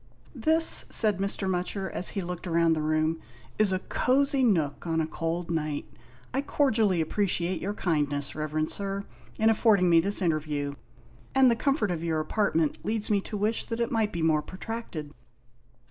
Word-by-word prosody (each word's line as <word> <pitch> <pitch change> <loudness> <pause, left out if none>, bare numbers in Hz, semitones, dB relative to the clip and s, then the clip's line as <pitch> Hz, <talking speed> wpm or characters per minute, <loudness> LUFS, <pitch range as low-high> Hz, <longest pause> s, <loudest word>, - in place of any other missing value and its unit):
"This," 320 +1 +3
said 210 -5 +2
Mr. 195 0 -1
Mutcher, 190 +1 -2
as 180 - 0
he 195 - -1
looked 180 +1 -6
round 165 -1 +3
the 155 - -2
room, 155 +1 0 0.4
"is 215 -2 +4
a 185 - +2
cosy 275 +7 +1
nook 165 - +1
on 165 0 0
a 160 - +1
cold 165 +2 -3
night. 155 -3 -2 0.5
I 270 - +1
cordially 220 - +2
appreciate 175 0 -1
your 205 +2 -3
kindness. 145 -6 -1
Reverend 155 0 -2
Sir, 200 0 -3 0.3
in 220 +1 +4
affording 205 -5 +3
me 165 - +7
this 200 +3 +2
interview, 150 -3 -1 0.6
and 265 -2 +6
the - - +2
com 275 +4 +1
fort 210 - -1
of 170 -2 -3
your 160 -2 0
apartment 160 -2 0
leads 215 +1 -2
me 200 -1 +3
to 210 - -6
wish 215 +3 0
that 230 0 -4
it 235 - -1
might 220 -3 +1
be 170 -4 -3
more 155 -2 +3
protracted." 185 -6 -7
180 Hz, 175 wpm, -27 LUFS, 160-215 Hz, 0.6 s, me